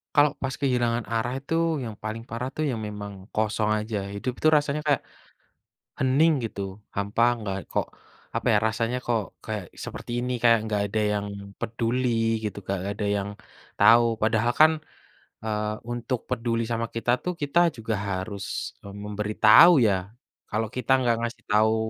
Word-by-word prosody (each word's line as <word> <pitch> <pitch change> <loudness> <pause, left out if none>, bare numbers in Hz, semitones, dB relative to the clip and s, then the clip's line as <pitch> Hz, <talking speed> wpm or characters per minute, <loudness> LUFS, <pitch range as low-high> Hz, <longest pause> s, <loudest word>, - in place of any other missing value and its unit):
Kalo 145 0 +7
pas 135 -1 -3
kehilangan 120 -3 +1
arah 120 +3 -1
itu, 150 +4 -4 0.3
yang 110 -2 -6
paling 110 +2 -6
parah 125 +3 -4
tuh 155 -1 0
ya 125 - -1
memang 105 -2 -6 0.2
kosong 110 0 0
aja, 110 0 -4 0.2
hidup 125 +5 -3
tuh 155 - +7
rasanya 150 +1 0
kayak, 145 -2 +2 1.0
hening 140 +1 +3
gitu, 100 -1 -5
hampa 100 +3 +1 0.2
nggak, 100 -3 -3
kok - - 0 0.5
apa - - -1
ya, 105 - +5
rasanya 115 +3 -1
kok, 115 -4 -2
kayak 105 -5 -5
seperti - - -7
ini, 125 +1 -2
kayak 115 -1 +6
nggak 105 -1 0
ada 110 - 0 0.2
yang 100 0 -2 0.3
peduli 115 -1 0
gitu, 105 -1 -3
nggak 100 +2 -3
ada 105 - 0
yang 100 0 -3 0.5
tahu, 115 -1 +6
padahal 110 +2 +2
kan, 155 +1 +8 0.7
eee, 105 0 -1
untuk 120 0 -3
peduli 115 0 0
sama 115 0 -2
kita 115 +1 -1
tuh 180 -1 -3
kita 170 +3 +3
juga 115 0 -3 0.2
harus, 95 +1 -4
eee, 100 - -10
memberitahu 105 - +6
ya? 95 -1 +1 0.4
Kalau 110 +1 -1
kita 125 0 -2
nggak 120 -3 +2
ngasih 120 0 -4
tahu 110 +1 +4
115 Hz, 160 wpm, -26 LUFS, 105-125 Hz, 1.0 s, kan